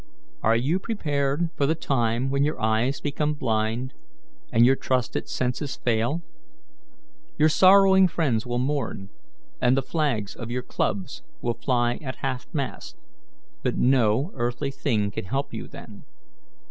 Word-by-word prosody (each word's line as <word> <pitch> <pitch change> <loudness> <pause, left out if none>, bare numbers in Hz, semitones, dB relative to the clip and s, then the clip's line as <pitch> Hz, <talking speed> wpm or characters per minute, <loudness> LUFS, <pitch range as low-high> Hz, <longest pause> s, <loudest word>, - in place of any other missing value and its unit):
Are 115 - +3
you 140 +10 +1
prepared 150 -6 -1
for 140 - +1
the 160 - +2
time 125 -3 0
when 140 0 +2
your 150 +2 -1
eyes 110 +5 +1
become 150 +1 -1
blind, 115 0 -1 0.6
and 115 +1 +5
your 130 +2 +5
trusted 130 -2 -1
senses 130 +3 -2
fail? 120 +8 0 1.1
Your 155 - +5
sorrowing 190 +2 +6
friends 140 -10 0
will 120 -1 -3
mourn, 130 -7 -2 0.5
and 125 +2 +4
the 135 - +1
flags 125 -11 -1
of 115 -1 -7
your 125 +1 -2
clubs 95 - -2 0.2
will 120 - +1
fly 120 0 0
at 130 -3 -5
half 130 -2 -3
mast, 135 - -4 0.6
but - - -1
no 125 - +3
earthly 120 +3 -2
thing 110 -8 0
can - - -5
help 135 +9 -2
you - - -5
then. - - -11
130 Hz, 145 wpm, -25 LUFS, 115-145 Hz, 1.1 s, sorrowing